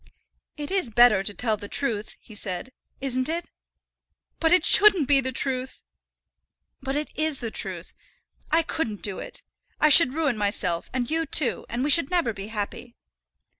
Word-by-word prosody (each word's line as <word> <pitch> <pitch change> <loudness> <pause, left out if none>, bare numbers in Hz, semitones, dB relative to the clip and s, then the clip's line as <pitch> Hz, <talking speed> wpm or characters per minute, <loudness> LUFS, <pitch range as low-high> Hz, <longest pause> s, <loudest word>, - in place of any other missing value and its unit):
"It 295 +2 -7
is 380 -10 -1
better 230 -3 +4
to 195 - -4
tell 220 +1 -2
the 205 - -10
truth," 220 -4 -2
he 220 - -17
said; 200 +2 -5 0.3
"isn't 260 0 -2
it?" 335 +1 -5 0.9
"But 325 -1 +1
it 360 - +3
shouldn't 395 -9 +6
be 275 -1 +3
the 260 0 -2
truth." 260 0 -2 1.0
"But 270 +1 -4
it 295 +1 -4
is 310 -2 0
the 230 -3 -5
truth. - - -4 0.6
I 330 +1 +2
couldn't 230 -10 -4
do 200 -3 -2
it. - - -9 0.4
I 305 - +4
should 290 -3 +7
ruin 290 -9 -1
myself 190 -4 -1
and 250 0 -3
you 325 0 -1
too, 280 -2 +1
and 240 +2 -3
we 295 - +1
should 315 -2 +5
never 340 -11 -1
be 195 0 -9
happy." 220 +3 -7
260 Hz, 170 wpm, -24 LUFS, 220-310 Hz, 1.0 s, should